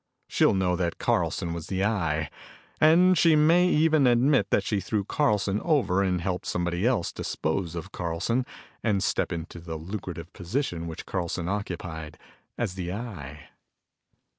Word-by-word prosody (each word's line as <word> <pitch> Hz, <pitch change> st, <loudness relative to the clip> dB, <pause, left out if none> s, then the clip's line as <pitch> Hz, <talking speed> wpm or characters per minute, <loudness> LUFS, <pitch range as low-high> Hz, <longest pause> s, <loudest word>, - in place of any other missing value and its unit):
She'll -, -, +3 dB
know 90 Hz, -2 st, +1 dB
that 85 Hz, -1 st, -1 dB
Carlson 85 Hz, -, 0 dB
was 85 Hz, -2 st, -6 dB
the 95 Hz, 0 st, 0 dB
Eye. 80 Hz, -8 st, 0 dB, 0.5 s
And 175 Hz, +4 st, +6 dB
she 165 Hz, -1 st, +5 dB
may 165 Hz, +4 st, +5 dB
even 155 Hz, -4 st, +4 dB
admit 125 Hz, -3 st, +3 dB
that 100 Hz, -, +2 dB
she 100 Hz, +1 st, 0 dB
threw 105 Hz, 0 st, -1 dB
Carlson 105 Hz, -5 st, +1 dB
over 110 Hz, -, +2 dB
and 90 Hz, -2 st, +1 dB
helped 90 Hz, 0 st, -3 dB
somebody 90 Hz, +4 st, 0 dB
else 120 Hz, -9 st, +1 dB
dispose 85 Hz, +1 st, -2 dB
of 85 Hz, +3 st, -6 dB
Carlson 95 Hz, +10 st, -1 dB, 0.4 s
and 100 Hz, -4 st, +1 dB
step -, -, 0 dB
into 85 Hz, +1 st, -5 dB
the 80 Hz, -1 st, -6 dB
lucrative 85 Hz, 0 st, -6 dB
position 90 Hz, -, -3 dB
which 80 Hz, -, -7 dB
Carlson 85 Hz, -2 st, -3 dB
occupied 90 Hz, -5 st, -4 dB, 0.4 s
as 90 Hz, -, -1 dB
the 90 Hz, -2 st, -4 dB
Eye." 90 Hz, -, -7 dB
95 Hz, 150 wpm, -27 LUFS, 85-120 Hz, 0.5 s, And